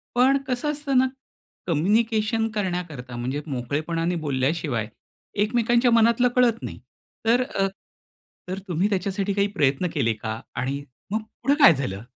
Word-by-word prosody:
पण 265 +3 +5
कसं 260 +4 0
असतं 285 -2 -1
ना, 260 +1 +5 0.6
कम्युनिकेशन 220 +6 +2
करण्याकरता, 175 -11 -3
म्हणजे 130 +4 -3
मोकळेपणाने 155 +6 -2
बोलल्याशिवाय 135 -4 0 0.6
एकमेकांच्या 235 +2 +2
मनातलं 230 +2 +4
कळत 240 -2 +3
नाही. - - -6 0.5
तर 235 +3 +4
अ, 195 -7 -1 0.8
तर 190 +1 -3
तुम्ही 180 +4 +1
त्याच्यासाठी 195 +1 -1
काही 200 0 +2
प्रयत्न 140 +5 +2
केले 115 -7 +1
का? 110 +1 -5 0.2
आणि 135 +3 -2 0.3
मग 220 +1 0 0.2
पुढं 275 +3 +4
काय 170 - +10
झालं? 105 -7 -4
185 Hz, 135 wpm, -24 LUFS, 140-230 Hz, 0.8 s, काय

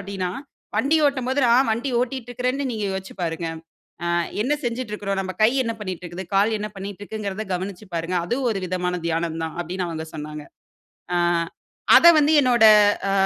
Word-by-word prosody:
அப்படீன்னா, 195 -2 -4 0.5
"வண்டி 310 +4 +3
ஓட்டும் 260 -3 -1
போது, 280 +2 +1
நான் 240 0 +4
வண்டி 250 +4 -2
ஓட்டிட்டு 250 -1 -3
இருக்கிறேன்னு 255 +3 -1
நீங்க 215 -2 -3
யோசிச்சு 190 0 -6
பாருங்க. 165 0 -2 0.6
ஆ - - -2 0.4
என்ன 270 +5 0
செஞ்சிட்டு 235 -2 -3
இருக்கிறோம்? 200 -2 -2
நம்ப 185 0 -5
கை 220 - +6
என்ன 230 - -1
பண்ணிட்டு 185 -3 -5
இருக்குது? 175 +1 -7
கால் 215 +3 +3
என்ன 210 +1 -4
பண்ணிட்டுருக்குங்கிறத 205 +1 -5
கவனிச்சுப் 185 +1 -6
பாருங்க. 165 +2 -2
அது 240 - -1
ஒரு 195 -3 -2
விதமான 180 0 -2
தியானம் 165 0 -1
தான்" 160 - -6
அப்பிடின்னு 180 +1 -3
அவுங்க 160 -1 -5
சொன்னாங்க. 150 -1 -7 0.7
ஆ, - - +2 0.8
அதை 340 - +8
வந்து 300 +1 +4
என்னோட 245 -4 +3 0.5
அ, - - +1
200 Hz, 170 wpm, -23 LUFS, 180-240 Hz, 0.8 s, அதை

